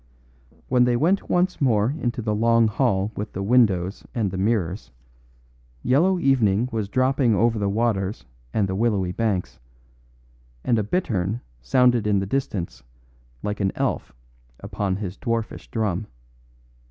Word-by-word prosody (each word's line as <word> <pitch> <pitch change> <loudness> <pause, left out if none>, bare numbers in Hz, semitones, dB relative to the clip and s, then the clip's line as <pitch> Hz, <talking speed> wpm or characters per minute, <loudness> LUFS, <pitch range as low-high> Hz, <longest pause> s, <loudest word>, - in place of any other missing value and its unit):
When 125 -1 +4
they 125 -1 +2
went 175 +10 +1
once 180 -1 +1
more 115 -3 +3
into 120 -5 -3
the 105 -1 0
long 115 +1 +3
hall 105 -3 0
with 105 +1 -5
the 95 - -3
windows 100 -5 +2
and 105 -6 0
the 95 - -4
mirrors, 95 - -1 0.9
yellow 165 +10 +3
evening 125 - +2
was 110 -4 -2
dropping 130 -1 +2
over 115 +1 +2
the 100 -1 0
waters 100 - -1 0.3
and 105 -3 +1
the 95 - -3
willowy 100 -3 +1
banks; 100 -3 -2 1.0
and 115 -2 +2
a - - 0
bittern 110 - -1 0.2
sounded 120 - +3
in 105 -1 +3
the 95 - 0
distance 95 - -3 0.6
like 105 0 -3
an 95 -2 +1
elf - - -2 0.5
upon 100 -1 -2
his 95 -1 -5
dwarfish 115 -3 -3
drum. 105 -3 -1
110 Hz, 140 wpm, -23 LUFS, 100-125 Hz, 1.0 s, When